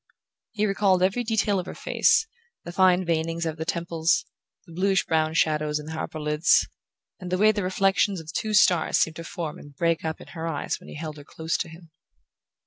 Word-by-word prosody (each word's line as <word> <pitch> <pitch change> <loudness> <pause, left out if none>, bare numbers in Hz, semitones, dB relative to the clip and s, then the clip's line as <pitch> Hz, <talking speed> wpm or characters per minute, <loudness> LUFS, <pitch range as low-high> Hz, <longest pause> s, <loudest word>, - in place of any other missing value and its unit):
He 215 -1 0
recalled 195 -2 +2
every 195 +6 +1
detail 215 -3 +1
of 180 - -5
her - - -7
face, - - +3 0.4
the 175 - -7
fine 185 0 +3
veinings 165 0 -1
of 160 -1 -3
the 160 - -4
temples, 170 -1 0 0.4
the 170 - -14
bluish 195 +2 +1
brown 160 0 +1
shadows 150 -2 +1
in 150 +1 -7
her 160 0 -5
upper 155 - -5
lids, 150 +6 +3 0.5
and 180 -2 -7
the 185 - +1
way 215 +3 +5
the 210 -1 -2
reflections 195 +1 +1
of 160 0 -9
two 215 -1 -1
stars 180 -5 +4
seemed 160 -1 +1
to 165 - -6
form 165 -4 -5
and 145 -1 -14
break 165 +2 0
up 160 0 -3
in - - -13
her 165 -1 -5
eyes 155 -3 -3
when - - -14
he - - -9
held 155 0 -6
her 145 - -10
close 160 +3 -4
to - - -4
him... 165 0 -14
170 Hz, 215 wpm, -25 LUFS, 160-190 Hz, 0.5 s, way